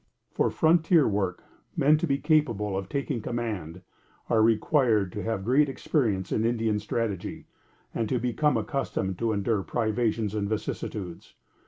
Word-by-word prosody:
For - - +1
frontier 165 -1 +4
work, 100 -3 -1 0.3
men, 150 +3 +5
to 170 - -1
be 140 -1 +1
capable 125 -10 +1
of 95 -1 -4
taking 140 -3 -2
command, 105 -8 -4 0.5
are 115 -2 +4
required 110 - +3
to 105 - -5
have 105 -1 -3
great 140 +5 +3
experience 110 - -1
in 110 - +1
Indian 115 -2 +1
strategy, 105 -2 -3 0.5
and 115 -2 -2
to 130 - +1
become 125 +5 +1
accustomed 95 -9 -2
to 115 -1 +1
endure 105 0 0
privations 110 0 -1
and 100 -2 -2
vicissitudes. 105 -4 -5
110 Hz, 145 wpm, -27 LUFS, 100-130 Hz, 0.5 s, men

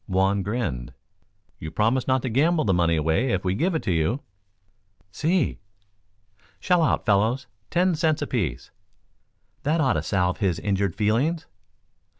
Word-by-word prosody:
Juan 95 +1 +1
grinned. 100 - -3 0.6
"You 80 - -6
promise 115 +9 +1
not 130 -1 +2
to 130 - -1
gamble 155 +7 +2
the 95 - +2
money 85 -1 +2
away 80 - +1
if 95 0 -1
we 90 - +1
give 170 - 0
it 160 - -1
to 95 - -1
you?" 85 - 0 0.9
"Si." 160 - 0 1.0
"Shell 180 -2 +2
out, 160 - +1
fellows. 110 +5 +2 0.2
Ten 180 +1 +2
cents 155 -2 +1
apiece. 95 - -3 0.9
That 155 +3 0
ought 135 -4 +3
to - - -1
salve 90 -2 0
his 95 -6 +1
injured 100 -3 -1
feelings." 130 +11 0
110 Hz, 150 wpm, -24 LUFS, 95-150 Hz, 1.0 s, ought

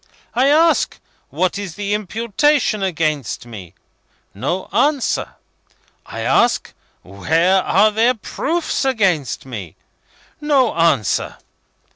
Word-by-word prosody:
I 255 +3 +2
ask, 320 +3 +3 0.3
what 185 +2 -1
is 190 -5 -6
the 205 0 -3
imputation 225 +4 0
against 155 - -2
me? 95 -7 -11 0.6
No 145 - -3
answer. 275 +3 0 0.7
I - - -6
ask, - - +1 0.3
where 165 - +1
are 210 +4 +3
their 230 +4 +2
proofs 315 +11 -2
against 195 - 0
me? 105 - -8 0.7
No 280 -5 +2
answer. 165 - +1
195 Hz, 100 wpm, -19 LUFS, 155-250 Hz, 0.7 s, ask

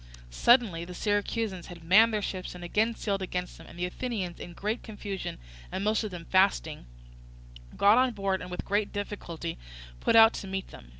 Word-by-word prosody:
Suddenly 205 - +4
the 180 +1 -8
Syracusans 205 -2 -1
had 170 -2 -11
manned 210 +7 +6
their 210 -1 -1
ships 185 -2 -4
and 175 - -9
again 220 +6 +1
sailed 200 -3 -2
against 180 -1 -4
them; - - -13
and - - -13
the 175 - -1
Athenians, 190 -3 -4
in 175 - -8
great 210 +6 -2
confusion 205 -3 -6 0.3
and 190 - -3
most 215 +2 +1
of 215 - -3
them 175 -3 -8
fasting, 185 - +2 0.9
got 205 +4 +6
on 255 -1 +3
board, 195 -2 -1
and 180 - -7
with 180 - -5
great 205 +1 0
difficulty 175 -5 -5 0.4
put - - +2
out 225 0 +8
to 195 - -6
meet 190 0 -4
them. - - -13
195 Hz, 190 wpm, -28 LUFS, 180-215 Hz, 0.9 s, out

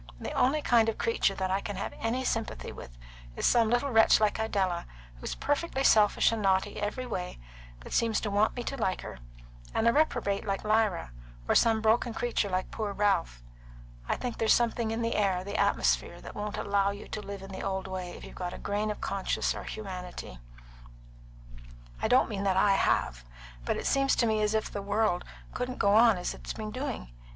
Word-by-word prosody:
The - - -5
only 290 +4 +2
kind 230 -2 +4
of 225 - -3
creature 230 -3 +1
that 185 -1 -2
I 195 +1 +1
can 205 - -5
have - - -4
any 235 +3 -1
sympathy 225 -3 -2
with - - -11 0.4
is - - -2
some 230 -2 +4
little 245 +4 +1
wretch 225 -2 +6
like 215 0 +1
Idella, 190 -6 -1 0.3
who - - -15
is - - -3
perfectly 290 -1 -1
selfish 210 -4 +5
and 225 -1 -2
naughty 190 +1 +1
every 215 +5 -2
way, 185 -7 -4 0.4
but - - -9
seems 230 -2 +2
to 210 - -2
want 205 +2 +2
me 245 - -4
to 275 - -4
like 190 -6 -1
her, - - -8 0.6
and 225 - +2
a 235 - +5
reprobate 245 -10 +1
like 195 -1 -2
Lyra, 215 - +1 0.4
or - - +3
some 225 -1 +4
broken 225 +1 +2
creature 235 -3 0
like 185 0 -2
poor 210 -2 -3
Ralph. - - 0 0.7
I - - +2
think 245 -2 -5
there's 225 - +5
something 235 -1 0
in 225 +1 -2
the 230 - 0
air, 190 -3 +1
the 200 +2 -6
atmosphere, - - +1
that - - -10
won't 210 0 -4
allow 200 -1 +1
you 200 +1 -7
to 210 - -4
live 200 -1 -7
in 195 - -9
the 190 - -6
old 190 0 -3
way 185 -2 -5
if - - -12
you've - - -11
got 180 -1 -5
a - - -8
grain 205 +1 -2
of 210 - -4
conscience 195 -1 -1
or - - -7
humanity. 180 - -7 1.6
I - - +1
don't 250 +3 +4
mean 200 -3 -4
that 195 -2 +1
I 200 +1 +4
have. - - +1 0.4
But - - 0
it - - -5
seems 275 0 +3
to 235 - +2
me 220 -1 +1
as 210 +1 +1
if 220 - -1
the 205 - -4
world 205 -2 +1 0.3
couldn't 250 0 -3
go 200 0 +3
on 225 -1 +6
as 180 - -3
it - - -12
has - - -2
been 215 -1 -6
doing. 255 - -4
210 Hz, 215 wpm, -29 LUFS, 195-230 Hz, 1.6 s, wretch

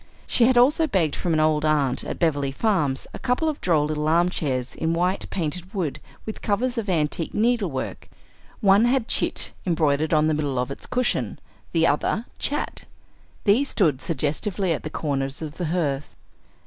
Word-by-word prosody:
She 235 - +3
had 255 0 +4
also 295 +6 +5
begged 175 - +1
from 175 - -2
an 155 - +2
old 155 -1 +2
aunt 145 -4 +1
at - - -5
Beverly 145 -5 +1
Farms 150 -6 0
a - - -7
couple 265 +5 0
of 305 -2 -2
droll 160 -4 +2
little 150 0 -2
armchairs 155 -6 +1
in 165 +1 -1
white 180 +3 0
painted 180 +3 -4
wood, 170 -8 -2 0.3
with 220 - -6
covers 240 +5 0
of 210 -3 -4
antique 160 -1 0
needle 225 -3 +2
work. 130 -2 -5 0.5
One 200 +2 +5
had 245 -1 +2
"Chit" - - 0
embroidered 155 -3 +1
on 155 -1 +4
the 155 - +2
middle 145 -3 -1
of 125 +2 -1
its - - -8
cushion; 250 -1 -1 0.3
the 165 -1 +3
other, 170 +9 +1
"Chat." 290 - -1 0.6
These 235 +7 +3
stood 150 - +1
suggestively 170 - -1
at 150 - -4
the 155 - -5
corners 135 -3 -2
of 155 -1 -7
the 180 - -2
hearth. 150 -4 -2
165 Hz, 175 wpm, -24 LUFS, 150-205 Hz, 0.6 s, also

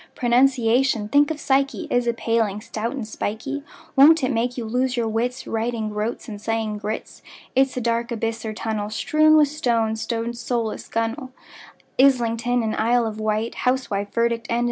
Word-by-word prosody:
Pronunciation—think 250 +1 +3
of 315 -1 -3
psyche!— 275 +4 0
Is 245 -1 +1
a 235 - +2
paling, 225 -3 0
stout 220 +2 -4
and 255 -6 -5
spikey; 225 +7 -4 0.3
Won't 295 +2 +7
it 255 - +1
make 245 +1 -1
you 235 - -3
lose 250 +3 0
your 235 -1 0
wits, 245 +4 -2
Writing 225 -1 -2
"groats" 210 +2 -3
and 205 -3 -7
saying 220 -1 -2
groats? 210 +1 -5 0.3
It's 265 0 +2
a - - -1
dark 235 0 -1
abyss 225 0 -2
or 220 - -3
tunnel, 215 -1 -3
Strewn 310 +8 +3
with 300 -2 +5
stones, 230 -7 -1
like 230 - -1
rowlock, 235 -1 -3
gunwale, 230 +4 -2 0.7
Islington 245 -2 +3
and 220 -1 -1
Isle 235 +1 +2
of 220 -1 -4
Wight, 215 +1 -1
Housewife, 240 -6 -1
verdict 235 0 0
and 235 - +1
indict! - - +1
235 Hz, 170 wpm, -23 LUFS, 220-255 Hz, 0.7 s, Won't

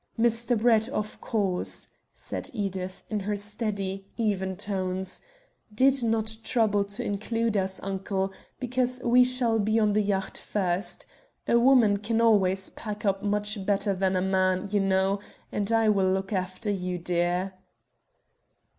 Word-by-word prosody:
"Mr. 235 +1 +2
Brett, 225 0 +3
of 215 -6 -4
course," 195 -5 -2 0.2
said - - -6
Edith, 190 -4 -4
in 215 - 0
her 205 +1 -2
steady, 200 -2 -4
even 190 -4 -1
tones, 190 -1 -3 0.5
"did 265 +5 +3
not 220 -1 0
trouble 215 -4 +2
to 200 +1 -5
include 225 +2 -1
us, 190 -1 0
uncle, 195 0 -2 0.3
because 250 0 -1
we 245 +1 +6
shall 250 -3 +2
be 215 +2 +1
on 210 -2 +3
the 215 - +3
yacht 195 -2 -1
first. 185 -1 -2 0.4
A 235 - +4
woman 235 -5 +5
can 225 +3 -1
always 195 -4 +3
pack 210 -1 -6
up 195 -1 +1
much 210 0 +1
better 200 0 +1
than 190 0 0
a 185 - +1
man, 185 0 +1
you 210 - +2
know, 195 0 +2 0.3
and 205 +1 -1
I 225 -1 +3
will 195 -3 +3
look 195 +2 -2
after 185 +3 -1
you, 180 -2 -2
dear." 175 +2 0
205 Hz, 145 wpm, -27 LUFS, 190-225 Hz, 0.5 s, we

